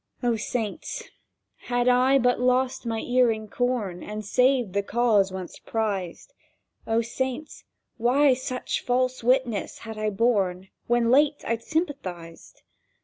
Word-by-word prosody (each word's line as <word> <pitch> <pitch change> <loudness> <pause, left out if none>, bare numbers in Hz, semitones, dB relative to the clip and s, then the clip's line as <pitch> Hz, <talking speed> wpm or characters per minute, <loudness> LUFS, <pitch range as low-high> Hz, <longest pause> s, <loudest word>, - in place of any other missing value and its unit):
O 240 -1 +2
Saints, 220 -1 -4 0.6
had 245 0 0
I 255 +2 +5
but 250 -2 +2
lost 255 0 +1
my 225 -1 -1
earing 235 -3 +1
corn 220 -7 -2
And 210 0 -6
saved 250 -2 +2
the 200 - +1
cause 210 -3 +2
once 185 -2 -7
prized! 210 - -3 0.5
O 225 +1 +2
Saints, 260 +5 -4 0.3
why 260 +4 +4
such 255 0 -3
false 255 0 0
witness 245 -3 +1
had 220 -1 -7
I 215 0 0
borne 195 -4 0 0.2
When 240 -1 +2
late 290 +2 +3
I'd 230 0 -1
sympathized!. 190 - -5
240 Hz, 130 wpm, -25 LUFS, 215-255 Hz, 0.6 s, I